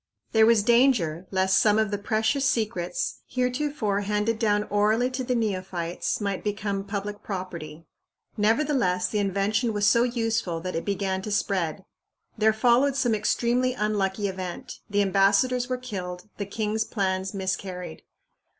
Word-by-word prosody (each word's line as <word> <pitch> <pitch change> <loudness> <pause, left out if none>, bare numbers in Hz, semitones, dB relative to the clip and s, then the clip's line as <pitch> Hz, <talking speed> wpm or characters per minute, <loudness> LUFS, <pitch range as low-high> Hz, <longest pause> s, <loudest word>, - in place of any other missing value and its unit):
There 220 -1 +5
was 230 -3 +4
danger 215 - +3
lest 190 0 +3
some 210 -1 +4
of 220 -2 +1
the 205 - -2
precious 220 +6 0
secrets, 215 -9 -1
heretofore 250 -5 -1
handed 210 +2 0
down 210 -2 +2
orally 215 +5 +2
to 255 0 -3
the 250 0 -1
neophytes, 185 -6 -2
might 200 -3 -2
become 205 -1 -2
public 205 0 -4
property. 170 -5 -6 0.5
Nevertheless, 215 -5 +1
the 210 - -1
invention 200 +4 0
was 205 -1 +1
so 225 +3 +5
useful 225 -7 0
that 185 +1 -4
it 165 - -3
began 195 -1 -1
to 210 - -5
spread. 190 -3 -1 0.5
There 220 0 +4
followed 245 +5 +3
some 245 -4 +1
extremely 240 +4 +1
unlucky 205 -2 0
event 185 -2 -6
the 205 0 +2
ambassadors 205 +6 +2
were 255 - 0
killed, 185 -6 -6
the 200 - -4
king's 220 +1 -1
plans 190 -2 -2
miscarried. 190 -1 -4
205 Hz, 145 wpm, -26 LUFS, 190-230 Hz, 0.5 s, There